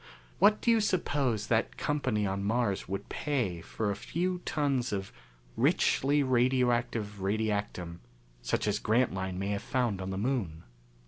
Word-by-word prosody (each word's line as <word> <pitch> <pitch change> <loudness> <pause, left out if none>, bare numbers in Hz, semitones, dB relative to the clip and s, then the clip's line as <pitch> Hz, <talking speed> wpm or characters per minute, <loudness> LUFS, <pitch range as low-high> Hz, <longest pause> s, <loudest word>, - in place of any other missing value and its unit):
What 205 +4 +5
do 235 - +3
you 225 -1 +4
suppose 140 - 0
that 115 -1 0
company 130 -8 0
on 100 0 -2
Mars 105 -2 0
would 95 0 -4
pay 120 - -2
for 105 +4 -2
a - - -2
few 180 - -2
tons 140 -5 0
of 95 -1 -3 0.4
richly 145 +2 +3
radioactive 120 -5 +1
radiactum 100 -4 -2 0.4
such - - -1
as 105 0 +1
Grantline 95 -6 0
may 100 +1 -2
have 100 -1 -1
found 120 -7 -1
on 95 - -4
the 95 - -3
Moon?" 100 -8 -2
110 Hz, 145 wpm, -30 LUFS, 100-130 Hz, 0.4 s, What